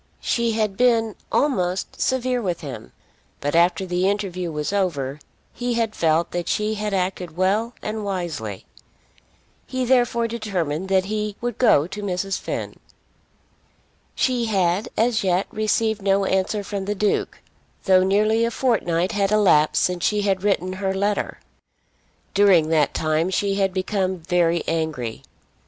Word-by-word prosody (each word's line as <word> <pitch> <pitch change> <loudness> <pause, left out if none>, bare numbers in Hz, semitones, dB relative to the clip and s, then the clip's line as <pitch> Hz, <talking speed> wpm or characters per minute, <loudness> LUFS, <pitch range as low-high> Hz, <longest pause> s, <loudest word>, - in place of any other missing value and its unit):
She 235 -1 0
had 215 -3 -1
been 230 -3 +2 0.2
almost 185 -10 0
severe 255 -1 0
with 180 -5 -2
him; 140 -5 -8 0.5
but 145 - -2
after 175 +2 +3
the 180 +1 +1
interview 185 -4 -2
was 150 +4 -3
over, 150 -8 -1 0.3
he 245 0 -2
had 225 -2 0
felt 165 +1 +1
that 175 -1 -3
she 210 +1 0
had 210 0 -3
acted 180 -3 -2
well 210 +6 +1
and 215 0 -3
wisely. 170 - -4 1.0
He 255 -1 -2
therefore 240 -2 +2
determined 190 -7 -3
that 190 -1 +3
he 210 0 -3
would 240 -1 -4
go 150 - +5
to 195 +4 -7
Mrs. 195 0 -2
Finn. - - -5 1.4
She 250 -2 +1
had 190 -2 +1
as 230 -1 +2
yet 185 0 +1
received 215 0 0
no 195 0 +2
answer 190 +2 0
from 195 0 -4
the 205 +1 -2
Duke, 205 +1 0 0.5
though 185 -1 +5
nearly 215 +4 +2
a 230 - +2
fortnight 190 -8 0
had 200 -2 0
elapsed 185 -8 +4
since 180 -1 -1
she 210 -1 +1
had 195 -2 +1
written 190 -2 0
her 190 -1 0
letter. 205 +1 -1 0.9
During 190 -6 +5
that 155 -3 +2
time 155 +2 +1
she 195 +1 0
had 195 -1 +1
become 190 0 -1
very 170 -1 +1
angry. 155 -9 -2
195 Hz, 145 wpm, -22 LUFS, 175-215 Hz, 1.4 s, go